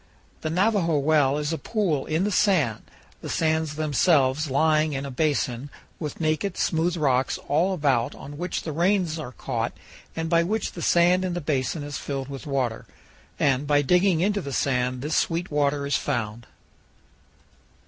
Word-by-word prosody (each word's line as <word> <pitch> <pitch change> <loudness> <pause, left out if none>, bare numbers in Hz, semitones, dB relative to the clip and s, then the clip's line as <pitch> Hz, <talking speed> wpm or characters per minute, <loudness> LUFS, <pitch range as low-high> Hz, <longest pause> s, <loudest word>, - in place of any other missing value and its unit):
The 155 - -2
Navajo 180 -2 +2
Well 145 -1 +3
is 150 +2 -2
a 160 - -3
pool 185 -11 -1
in 160 +3 0
the 210 - 0
sand, 180 - +2 0.4
the - - -6
sands 160 -2 0
themselves 150 -1 +2
lying 155 +2 +2
in 135 0 -3
a 140 - -6
basin, 135 -2 -1 0.3
with 150 -4 -5
naked, 155 +4 -1
smooth 170 +1 0
rocks 135 -4 +1
all 165 +7 +2
about 140 -9 +1
on 145 +2 -10
which 180 +1 -3
the 160 - -4
rains 170 0 +1
are 140 -5 -6
caught 120 -2 -3 0.4
and 165 0 -2
by 170 0 +3
which 205 +5 -1
the 170 - -8
sand 175 +3 +4
in 180 -2 -2
the - - -1
basin 145 0 -1
is 145 0 -5
filled 135 -1 -4
with 140 +3 -7
water, 130 -5 -2 0.5
and 140 0 +1
by 145 0 +3
digging 180 +2 +3
into 200 +2 +1
the 140 - -6
sand 125 -1 0
this 155 +2 -1
sweet 170 +2 0
water 145 -1 +1
is 140 - +1
found. 115 -4 -3
155 Hz, 170 wpm, -25 LUFS, 140-170 Hz, 0.5 s, sand